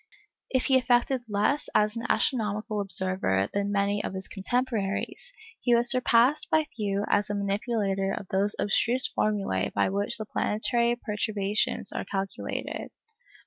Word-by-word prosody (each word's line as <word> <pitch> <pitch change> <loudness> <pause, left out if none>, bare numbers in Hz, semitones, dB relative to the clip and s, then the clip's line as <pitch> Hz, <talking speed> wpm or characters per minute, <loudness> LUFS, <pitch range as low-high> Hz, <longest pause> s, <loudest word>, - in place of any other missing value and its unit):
If 260 -1 0
he 265 -1 +4
effected 245 +1 +1
less 210 +8 0
as 210 +1 +2
an 230 - -4
astronomical 215 -3 0
observer 185 - +2
than 200 0 -1
many 200 0 0
of - - -4
his 190 0 -5
contemporaries, 225 - -3 0.3
he 240 -1 +3
was 240 +1 +3
surpassed 250 +3 +3
by 315 -1 +2
few 205 -2 -1
as 205 - +1
a 205 - -2
manipulator 200 -1 -1
of 195 - -5
those 200 +2 0
abstruse 240 +5 +2
formulæ 210 -2 -1
by - - +1
which 200 +1 +2
the 215 - -5
planetary 235 +3 +1
perturbations 210 -3 -1
are - - -4
calculated. 195 0 -4
210 Hz, 145 wpm, -27 LUFS, 200-240 Hz, 0.3 s, he